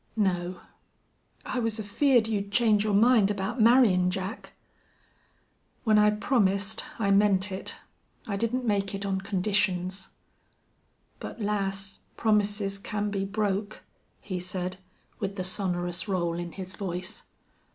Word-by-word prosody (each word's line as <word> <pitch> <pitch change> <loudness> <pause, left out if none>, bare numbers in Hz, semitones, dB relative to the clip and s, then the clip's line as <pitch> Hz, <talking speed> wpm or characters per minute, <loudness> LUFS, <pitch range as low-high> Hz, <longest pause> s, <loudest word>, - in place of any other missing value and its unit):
"No." 180 -3 0 0.8
"I 255 - -2
was 225 -2 0
afeared 225 +3 +3
you'd 200 -2 -2
change 210 -2 +4
your 210 -2 +1
mind 220 -1 +5
about 205 +4 -2
marryin' 215 -6 +5
Jack." 190 +4 -5 1.3
"When 215 -3 +4
I 210 0 +6
promised 210 -2 +1
I 200 -3 +1
meant 195 -1 +4
it. 190 - -4 0.5
I 200 - -2
didn't 230 +5 -1
make 200 -2 0
it 195 0 -4
on 190 -1 -1
conditions." 190 -1 0 1.1
"But, - - -7
lass, 200 -2 -2 0.2
promises 205 -2 +1
can 205 0 -3
be 195 -1 -1
broke," 205 0 -2 0.4
he 185 -3 -4
said, 180 0 -3 0.4
with 195 0 -3
the 185 - -3
sonorous 180 -1 -2
roll 175 -4 0
in 175 -1 -5
his 190 0 -6
voice. 185 0 -5
200 Hz, 130 wpm, -28 LUFS, 190-215 Hz, 1.3 s, I